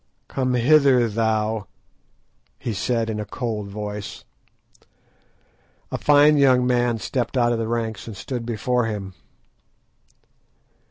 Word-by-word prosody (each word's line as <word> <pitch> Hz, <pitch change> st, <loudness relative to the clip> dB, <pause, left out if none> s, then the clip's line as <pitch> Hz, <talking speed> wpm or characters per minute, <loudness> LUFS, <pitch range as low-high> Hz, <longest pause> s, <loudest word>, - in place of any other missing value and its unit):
"Come 130 Hz, -1 st, -1 dB
hither, 130 Hz, -1 st, +4 dB
thou," 110 Hz, -1 st, -1 dB, 0.9 s
he 115 Hz, -, -4 dB
said, 115 Hz, +3 st, -1 dB
in 110 Hz, -1 st, -3 dB
a -, -, -2 dB
cold 105 Hz, -1 st, -4 dB
voice. 105 Hz, 0 st, -6 dB, 1.7 s
A -, -, -3 dB
fine 150 Hz, +1 st, +5 dB
young 130 Hz, -3 st, +4 dB
man 120 Hz, -2 st, +1 dB
stepped 120 Hz, +6 st, -3 dB
out 120 Hz, -1 st, +3 dB
of 115 Hz, -, -2 dB
the 115 Hz, -, -2 dB
ranks, 115 Hz, -2 st, -3 dB
and 110 Hz, -4 st, -8 dB
stood 125 Hz, +1 st, -5 dB
before 120 Hz, +1 st, 0 dB
him. 100 Hz, -3 st, -5 dB
115 Hz, 120 wpm, -23 LUFS, 105-125 Hz, 1.7 s, fine